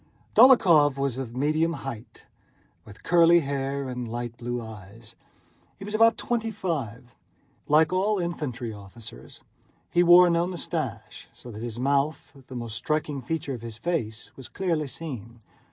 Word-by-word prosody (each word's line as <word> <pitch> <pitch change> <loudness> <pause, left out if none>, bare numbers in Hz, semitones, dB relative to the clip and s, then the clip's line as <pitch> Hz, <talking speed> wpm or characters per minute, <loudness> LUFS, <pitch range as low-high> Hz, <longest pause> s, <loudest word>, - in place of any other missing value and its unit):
Dólokhov 170 - +6
was 135 -2 -2
of 120 -3 -6
medium 155 +4 +1
height, 130 -6 -8 0.6
with 105 -2 -15
curly 170 0 +5
hair 140 -1 -3
and 125 -1 -5
light 120 0 -5
blue 120 +1 -4
eyes. 110 +1 -11 0.6
He 195 - -9
was 210 - -7
about 225 +1 +4
twenty 230 -2 -2
five. 125 - -4 0.5
Like 155 +3 +4
all 200 +3 +1
infantry 145 - -4
officers 100 - -12 0.5
he 175 - +3
wore 175 0 +7
no 170 +1 +1
mustache, 165 - -5
so 120 - -12
that 110 0 -9
his 120 -1 -5
mouth, 140 +3 -1
the 130 - -9
most 115 -2 -5
striking 150 -2 -2
feature 145 +2 -3
of 120 - -7
his 115 -2 -7
face, 120 -9 -3
was 130 - -10
clearly 165 -6 -2
seen. 120 -6 -8
140 Hz, 150 wpm, -26 LUFS, 120-170 Hz, 0.6 s, wore